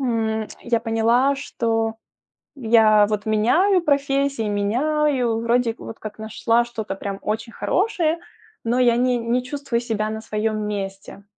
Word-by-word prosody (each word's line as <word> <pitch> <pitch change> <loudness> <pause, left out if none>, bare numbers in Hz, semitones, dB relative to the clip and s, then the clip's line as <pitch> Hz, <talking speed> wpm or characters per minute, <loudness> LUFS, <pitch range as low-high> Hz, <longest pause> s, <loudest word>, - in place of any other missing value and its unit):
М, 220 -4 -1
я 235 -2 0
поняла, 230 +4 +2
что 225 -5 -1 0.6
я 220 -4 +4
вот 210 0 -2
меняю 330 - +3
профессии, 275 -5 +1
меняю, 245 +3 +1
вроде 235 0 +1
вот 225 - -9
как 215 0 -8
нашла 230 +2 +1
что-то 220 -4 -5
прям 195 0 -5
очень 225 +2 -3
хорошее, 345 -5 0 0.5
но 240 +2 +1
я 240 -2 +4
не 250 0 +2
не 235 +2 0
чувствую 260 -2 -3
себя 215 -3 -2
на 220 0 -4
своем 215 -1 -2
месте. 195 -1 -6
230 Hz, 135 wpm, -22 LUFS, 215-255 Hz, 0.6 s, я